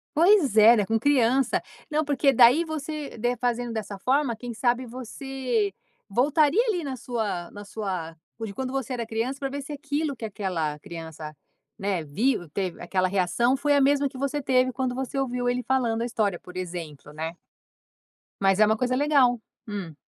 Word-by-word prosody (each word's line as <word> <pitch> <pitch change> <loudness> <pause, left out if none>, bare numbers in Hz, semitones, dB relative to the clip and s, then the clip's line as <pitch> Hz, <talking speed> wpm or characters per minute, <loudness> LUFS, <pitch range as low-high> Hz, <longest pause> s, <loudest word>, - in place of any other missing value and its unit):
Pois 335 - +5
é, 220 +2 +8
né, 205 - +2
com 225 +3 +1
criança. 255 0 +2 0.3
Não, 305 +1 +1
porque 285 -1 +3
daí 255 +5 +6
você 305 -3 -5
de 240 +2 0
fazendo 245 -1 -1
dessa 205 -3 -5
forma, 265 +3 +1
quem 235 +2 -7
sabe 245 +2 +1
você 250 -3 -3 0.4
voltaria 295 - +3
ali 355 -7 -1
na 270 -2 -3
sua 220 -8 -3
na 205 0 -9
sua, 185 -6 -4 0.2
p 225 - -3
de 200 - -7
quando 255 +3 -4
você 270 -1 -3
era 235 -2 -3
criança, 230 +4 -2
para 275 - -2
ver 280 +1 -4
se 295 +2 -7
aquilo 290 0 -2
que 235 - -12
aquela 180 -8 -2
criança, 160 -1 -8 0.4
né, 195 -3 -1
viu 185 - 0
teve 185 -3 -3
aquela 185 +1 0
reação, 200 +7 +2
foi 290 +1 +2
a 285 - +4
mesma 280 +1 +3
que 265 - -9
você 280 +2 -1
teve 255 -1 +2
quando 255 -1 -2
você 265 +1 -3
ouviu 245 -2 -1
ele 245 +1 0
falando 240 -4 +1
a - - 0
história, 210 -6 -1
por 180 - -13
exemplo, 170 -6 -6
né. 160 +2 -5 1.1
Mas 195 0 +3
é 215 - +7
uma 220 +1 +2
coisa 250 +2 0
legal. 270 -4 +3 0.3
Hum. 195 -7 -5
245 Hz, 185 wpm, -26 LUFS, 200-270 Hz, 1.1 s, é